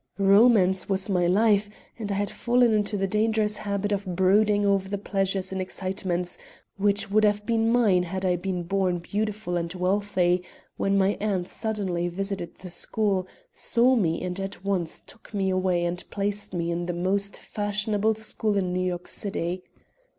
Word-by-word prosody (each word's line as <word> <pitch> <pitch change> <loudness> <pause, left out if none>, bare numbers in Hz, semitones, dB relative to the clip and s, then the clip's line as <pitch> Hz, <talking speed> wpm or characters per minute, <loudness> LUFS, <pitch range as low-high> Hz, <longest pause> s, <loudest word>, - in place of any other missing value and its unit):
Romance 195 -2 +4
was 195 +1 -1
my 180 -3 +2
life, 205 +2 +3 0.3
and 210 -2 -3
I - - 0
had 200 0 -1
fallen 240 -1 +2
into 210 0 +1
the 195 - 0
dangerous 215 +1 +1
habit 200 0 -2
of 195 -3 -2
brooding 205 +3 +3
over 195 -1 +1
the 200 - -2
pleasures 195 -1 -1
and 190 0 -2
excitements 185 -1 -3 0.4
which 205 0 +1
would 215 +1 +4
have 210 0 +2
been 225 0 +2
mine 215 -7 +4
had 185 +2 -3
I 180 -1 +3
been 180 0 -3
born 185 0 0
beautiful 205 +1 -2
and 170 -1 -3
wealthy, 185 -1 +1 0.3
when 195 0 +1
my 195 +1 +2
aunt 195 -4 -1
suddenly 190 -7 -2
visited 190 0 -4
the 180 -1 -10
school, 195 0 0 0.3
saw 255 - +3
me 170 -8 0
and 180 +1 -3
at 195 -1 -6
once 185 -5 -1
took 220 -1 -13
me 190 -1 +1
away 185 -2 +1
and 175 +1 -2
placed 205 0 -3
me 170 -2 -2
in 170 +1 -2
the 175 - -1
most 195 +3 -1
fashionable 210 +1 0
school 215 -1 -1
in 185 -2 0
New 180 - 0
York 180 -1 -2
City. 180 -2 -3
195 Hz, 170 wpm, -26 LUFS, 180-210 Hz, 0.4 s, Romance